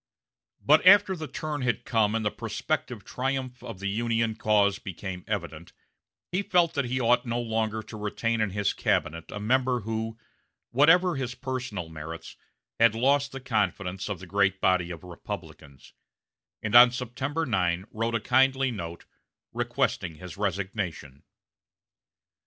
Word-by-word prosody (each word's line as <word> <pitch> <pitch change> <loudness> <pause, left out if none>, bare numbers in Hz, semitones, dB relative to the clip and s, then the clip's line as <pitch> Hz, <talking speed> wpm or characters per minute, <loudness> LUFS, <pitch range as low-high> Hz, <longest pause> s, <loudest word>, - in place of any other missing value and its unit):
But 150 +2 +6
after 200 0 +7
the 155 -3 -6
turn 150 +1 -4
had 120 -4 -1
come, 110 -2 +2
and 110 -1 -1
the 105 - +1
prospective - - -3
triumph 130 -1 -3
of 115 - -8
the 100 +2 -4
Union 115 +2 0
cause 100 -2 +2
became 95 -2 -6
evident, 85 -5 -5 0.6
he 185 +2 +1
felt 175 -4 +2
that 140 -3 0
he 130 +2 -1
ought 120 0 +2
no 120 +1 -1
longer 110 -1 -1
to 110 +1 -10
retain 110 +2 -1
in 105 - +1
his 100 +1 0
cabinet 85 +1 -1
a 105 - -6
member 125 +3 +1
who, 110 +1 -4 0.5
whatever 165 +6 +5
his 125 -2 -3
personal 125 - -4
merits, 80 +1 -8 0.4
had 115 -1 +5
lost 140 +4 +2
the 135 - -6
confidence 100 -6 -1
of 100 - -2
the 95 - -10
great 95 +1 +1
body 95 -2 +2
of 85 -1 -8
Republicans; 70 -5 -9 0.7
and 110 -1 -3
on 120 +1 +10
September 130 +6 -3
9 90 -6 0
wrote 115 +1 -1
him 110 - 0
a - - -26
kindly 135 +1 +3
note, 85 -6 -7 0.5
requesting 85 -3 -1
his 90 +3 -9
resignation. 95 -8 -3
110 Hz, 150 wpm, -27 LUFS, 95-130 Hz, 0.7 s, on